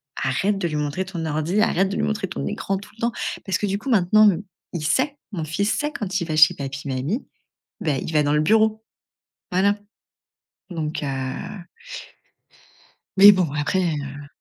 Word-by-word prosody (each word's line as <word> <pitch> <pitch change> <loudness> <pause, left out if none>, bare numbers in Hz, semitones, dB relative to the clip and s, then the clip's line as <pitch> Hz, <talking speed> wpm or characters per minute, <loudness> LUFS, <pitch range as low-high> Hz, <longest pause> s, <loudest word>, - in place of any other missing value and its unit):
arrête 190 +11 0
de 185 -3 -1
lui 155 - -4
montrer 150 +5 -2
ton 175 -4 -5
ordi, 160 +7 0
arrête 190 -3 +2
de - - -3
lui - - 0
montrer 70 -1 -1
ton 70 - -5
écran 195 - -2
tout 200 - -11
le - - -15
temps.» 235 +1 +1 0.3
Parce 190 -2 0
que, - - -2
du 195 0 0
coup, 240 +7 -6
maintenant, 215 -1 +5
m 180 -2 -1 0.3
il 155 -3 -3
sait, 265 - +1 0.2
mon 165 -5 -3
fils 200 +7 0
sait 295 0 -1
quand 195 -7 -2
il - - -1
va 155 - -2
chez 155 -1 +7
papy, 140 0 -6
mamie, 140 - -2 0.6
bah, 150 -9 0
il 160 - -5
va 150 -1 +4
dans 145 - +1
le 150 - +3
bureau. 220 +6 +3 0.7
Voilà. 200 +3 +3 0.9
Donc, 160 -3 -3
heu... 145 - -2 2.1
Mais 200 +1 +11
bon 185 -6 +1
après, 150 +5 0
heu 145 -3 -4
175 Hz, 185 wpm, -23 LUFS, 150-205 Hz, 2.1 s, Mais